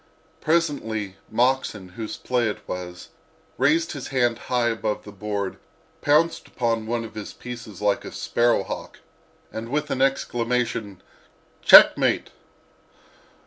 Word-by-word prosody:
Presently 115 - 0
Moxon, 120 -5 0
whose 110 +4 -6
play 125 -2 0
it 105 - -7
was, 90 -1 -6 0.5
raised 160 +5 +3
his 140 -4 -6
hand 120 -3 +1
high 120 -1 0
above 110 -2 -2
the 105 - -10
board, 100 -1 -4 0.4
pounced 155 +3 +2
upon 115 -2 -1
one 120 0 -1
of 110 - -10
his 105 -2 -7
pieces 115 -5 -9
like 100 -1 +1
a - - -8
sparrow 120 -4 +1
hawk - - -7 0.6
and 115 +1 -5
with 150 +2 -1
the 130 - -1
exclamation 120 -6 -1 0.6
"checkmate!" - - +7
115 Hz, 125 wpm, -24 LUFS, 105-130 Hz, 0.6 s, checkmate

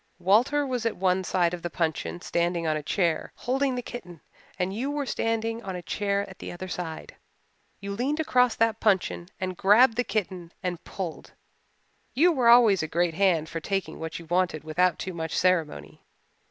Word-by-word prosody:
Walter 235 +11 +3
was 250 -3 -2
at 230 - -2
one 185 0 +1
side 180 -1 +1
of 175 - -5
the 175 - -3
puncheon 165 +1 -2
standing 170 -1 -1
on 155 -1 +1
a 155 - -2
chair, 170 +2 0
holding 265 +1 0
the 245 - -3
kitten, 180 -11 -9 0.4
and 185 +1 -1
you 250 +7 -2
were 290 -1 -2
standing 225 -1 -1
on 190 -3 -5
a 180 - -6
chair 200 +2 -1
at 190 - -13
the - - -6
other 180 +2 -7
side. 175 -3 -6 0.6
You 200 0 -6
leaned 260 +9 -1
across 250 -6 +3
that 225 0 +1
puncheon 190 -4 +1
and 185 -1 -3
grabbed 220 +6 +5
the 245 - +2
kitten 185 -6 -3
and 180 -2 -3
pulled. 180 -5 -6 0.8
You 340 +7 +5
were 255 -7 +3
always 235 -5 +7
a 160 - -2
great 170 +1 0
hand 170 -3 +2
for 165 - -5
taking 195 +3 -3
what 160 0 -5
you 170 - -10
wanted 175 -2 0
without 175 +2 +1
too 185 - -5
much 160 -1 -3
ceremony. 155 - 0
185 Hz, 190 wpm, -26 LUFS, 170-230 Hz, 0.8 s, always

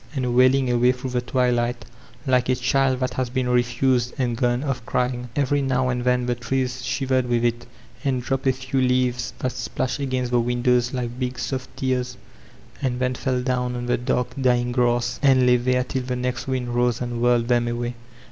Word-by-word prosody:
and 125 -3 -1
wailing 130 +1 +4
away 120 +1 +4
through 130 0 -5
the 125 -1 0
twilight, 125 -1 0 0.4
like 125 -1 +2
a 130 - +3
child 130 +1 +1
that 130 -1 -1
has 130 -2 -2
httn 125 -1 -1
refused 125 0 +1
and 125 -3 0
gone 120 +2 0
oflF 135 -4 -2
crying* 125 0 -1
Every 145 0 +1
now 130 -1 +1
and 125 -1 -1
then 125 0 +2
the 125 - +1
trees 125 +1 -2
shivered 130 -1 0
with 120 0 +1
it, 120 0 -1 0.4
and 135 -3 +1
dropped 135 +1 -1
a - - +6
few 130 +1 -2
leaves 125 -1 +1
that 130 - -2
splashed 130 +2 -3
against 130 -3 -2
the 120 - +3
windows 120 +1 +1
like 125 -1 -4
big, 125 -1 -2
soft 130 0 -4
tears, 125 -1 -1 0.6
and 125 -3 -1
then 125 0 0
fell 125 0 -1
down 125 -1 -1
on 120 0 -4
die 120 0 +1
dark, 125 0 -1
dying 125 -1 +2
grass, 120 -1 +1
and 135 -3 +5
lay 125 0 +5
there 125 +1 +1
till 130 +1 -3
the 125 0 -3
next 125 +1 -3
wind 130 -2 -2
rose 120 -1 +1
and 120 -1 -3
wUried 120 -1 +3
them 120 -1 +2
away. 120 0 -2
125 Hz, 200 wpm, -23 LUFS, 120-130 Hz, 0.6 s, a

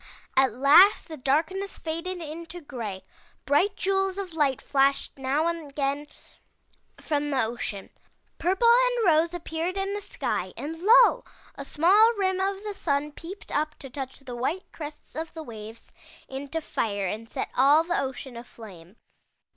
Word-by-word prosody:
At 265 -2 +4
last 295 - +6
the 320 - -7
darkness 315 +9 -1
faded 335 +2 -4
into 330 +3 -8
gray; 225 - -6 0.4
bright 365 +9 +2
jewels 385 0 0
of 390 -3 -4
Ught 290 -4 +1
flashed 275 0 +1
now 270 +4 +1
and 335 -3 -2
again 280 +1 -2 0.9
from 295 -1 -1
the 270 -4 +1
ocean. 220 -3 -4 0.5
Purple 380 +7 +2 0.2
and - - 0
rose 335 0 +3
appeared 335 +2 -3
in 390 +1 -1
the 410 - -3
sky - - -3
and 320 +3 -5
lo! 445 +6 +6 0.3
a - - -7
small 405 +9 +5
rim 380 -3 0
of 390 +1 -1
the 420 -1 -4
sun 295 -5 -1
peeped 345 +6 -10
up 305 +1 -1
to 270 - -10
touch 265 0 -6
the 250 -3 -8
white 295 +10 -3
crests 300 -1 -9
of 320 +1 -5
the 320 - -6
waves 225 -3 -10 0.4
into 280 +4 -5
fire 205 -8 -2
and 220 +4 -4
set - - -4
all 285 +5 +5
the 345 -3 0
ocean 265 -1 -6
aflame. 210 -6 -12
305 Hz, 155 wpm, -26 LUFS, 265-365 Hz, 0.9 s, last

